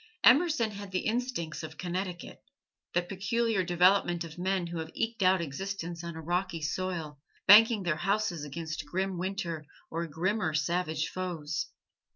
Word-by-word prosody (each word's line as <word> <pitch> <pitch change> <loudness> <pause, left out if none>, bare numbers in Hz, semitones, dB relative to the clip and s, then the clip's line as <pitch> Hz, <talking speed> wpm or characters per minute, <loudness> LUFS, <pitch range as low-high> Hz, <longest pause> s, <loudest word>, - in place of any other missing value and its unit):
Emerson 255 -3 +5
had 200 -1 -7
the 185 -1 -2
instincts 230 -8 -2
of 160 0 -8
Connecticut 180 0 -4 0.5
that 175 0 +1
peculiar 205 +2 0
development 175 0 +3
of 165 +1 -9
men 185 0 0
who 170 -1 -4
have 160 0 -5
eked 225 -1 -2
out 185 -1 +4
existence 170 +2 -4
on 170 -1 -5
a 160 - -6
rocky 175 +1 -1
soil, 165 -3 -3 0.3
banking 215 +1 +8
their 170 -4 0
houses 195 -2 0
against 160 +1 -5
grim 185 +3 -1
Winter 175 -4 -3 0.3
or 170 +1 -2
grimmer 170 +2 0
savage 160 0 0
foes. 165 -5 -3
180 Hz, 150 wpm, -30 LUFS, 165-195 Hz, 0.5 s, banking